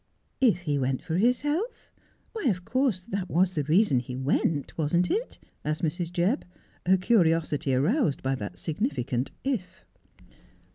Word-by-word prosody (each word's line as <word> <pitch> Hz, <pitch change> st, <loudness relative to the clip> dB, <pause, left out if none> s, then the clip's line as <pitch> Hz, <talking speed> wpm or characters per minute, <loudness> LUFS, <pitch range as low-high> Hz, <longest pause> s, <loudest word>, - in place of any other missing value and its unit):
' -, -, -44 dB
If 180 Hz, -1 st, -6 dB
he 145 Hz, -5 st, 0 dB
went 130 Hz, 0 st, -1 dB
for 165 Hz, -1 st, -1 dB
his 240 Hz, +5 st, +3 dB
health 340 Hz, +12 st, -3 dB, 0.2 s
— -, -, -38 dB
why, 435 Hz, -7 st, -4 dB
of 185 Hz, -7 st, +1 dB
course 255 Hz, -8 st, +1 dB
that 195 Hz, -3 st, -4 dB
was 185 Hz, +2 st, +2 dB
the 155 Hz, -, 0 dB
reason 155 Hz, -, +4 dB
he 125 Hz, +1 st, -6 dB
went, 140 Hz, +2 st, 0 dB
wasn't 170 Hz, +3 st, +1 dB
it? 470 Hz, +4 st, -2 dB
' -, -, -41 dB
asked 155 Hz, +2 st, -2 dB
Mrs. 170 Hz, +1 st, -1 dB
Jebb, 180 Hz, -, +1 dB, 0.5 s
her 190 Hz, +1 st, +6 dB
curiosity 165 Hz, -, +2 dB
aroused 165 Hz, -, +1 dB
by 135 Hz, 0 st, +1 dB
that 105 Hz, -6 st, -5 dB
significant 135 Hz, -5 st, -2 dB
' -, -, -41 dB, 0.2 s
if.' 180 Hz, -, -22 dB
170 Hz, 175 wpm, -27 LUFS, 145-200 Hz, 0.5 s, her